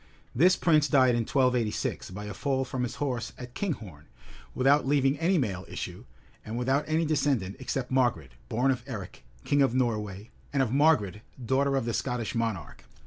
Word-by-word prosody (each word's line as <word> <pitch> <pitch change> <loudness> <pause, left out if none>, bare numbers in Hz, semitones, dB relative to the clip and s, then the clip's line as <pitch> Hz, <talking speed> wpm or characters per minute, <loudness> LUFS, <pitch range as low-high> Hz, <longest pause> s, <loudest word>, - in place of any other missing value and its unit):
This 180 +8 +5
prince 155 -4 +3
died 130 -2 +5
in 120 - +1
1286, 125 -5 0
by 105 +3 -7
a 105 - -5
fall 135 +5 -1
from 130 0 -4
his 125 -1 -2
horse 125 -5 -3
at 125 -1 -9
Kinghorn,[*] 105 - -5 0.5
without 135 +2 +3
leaving 135 -1 +3
any 175 +3 +2
male 100 - -1
issue, - - -6 0.4
and 110 +2 -5
without 135 +4 +1
any 160 +1 +1
descendant, 140 -10 0
except 130 -1 -3
Margaret, 120 - +1 0.2
born 125 +4 +2
of 125 -2 -2
Eric, 105 -8 -7 0.2
king 145 0 +2
of 130 -3 +3
Norway, 105 -5 -2 0.2
and 140 -2 +2
of 120 - -2
Margaret, 135 - +3 0.2
daughter 135 +3 +2
of 135 - 0
the 115 - -2
Scottish 125 -3 -2
monarch. 115 -6 -3
125 Hz, 175 wpm, -28 LUFS, 110-140 Hz, 0.5 s, This